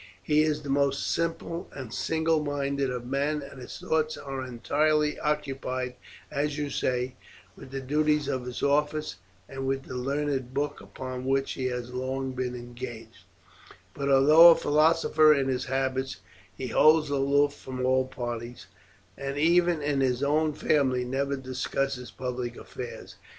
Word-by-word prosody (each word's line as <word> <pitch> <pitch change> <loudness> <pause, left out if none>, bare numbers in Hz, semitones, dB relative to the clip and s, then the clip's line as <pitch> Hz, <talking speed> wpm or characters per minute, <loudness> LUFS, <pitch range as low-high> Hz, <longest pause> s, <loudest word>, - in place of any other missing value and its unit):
He 150 +10 +3
is 150 -1 0
the 145 - -7
most 140 -1 +1
simple 165 +1 -2
and 130 -5 -7
single 160 -1 +1
minded 140 -1 -1
of 125 -1 -4
men, 140 +3 -1
and 140 -1 -10
his 125 - -8
thoughts 155 0 0
are 135 -2 -5
entirely 150 +5 +1
occupied, 135 -4 -2 0.4
as 150 0 -1
you 145 -1 -2
say, 125 0 -1 0.4
with - - -12
the 135 0 -5
duties 150 +2 +1
of 125 -1 -2
his 125 - -5
office 150 -2 +1 0.3
and 135 0 -5
with 135 0 -1
the - - -9
learned 135 0 -2
book 145 0 -2
upon 130 -1 -7
which 135 0 +1
he 130 -1 -2
has 125 -1 -4
long 130 +1 -2
been 125 -1 -3
engaged; 120 -4 -9 0.7
but 140 0 -2
although 150 +5 +8
a 165 - +8
philosopher 155 0 +4
in 135 -1 0
his 130 -1 -1
habits 130 0 -1 0.4
he 130 - -4
holds 155 +1 +5
aloof 140 +1 +2
from 130 -2 -5
all 130 0 +2
parties, 120 -3 -6 0.5
and 140 +1 -4
even 170 0 +3
in 145 -2 +1
his 130 0 +1
own 155 +2 +2
family 130 -4 +1
never 140 +2 -1
discusses 130 -1 -3
public 125 -2 -4
affairs. - - -8
135 Hz, 155 wpm, -27 LUFS, 130-150 Hz, 0.7 s, although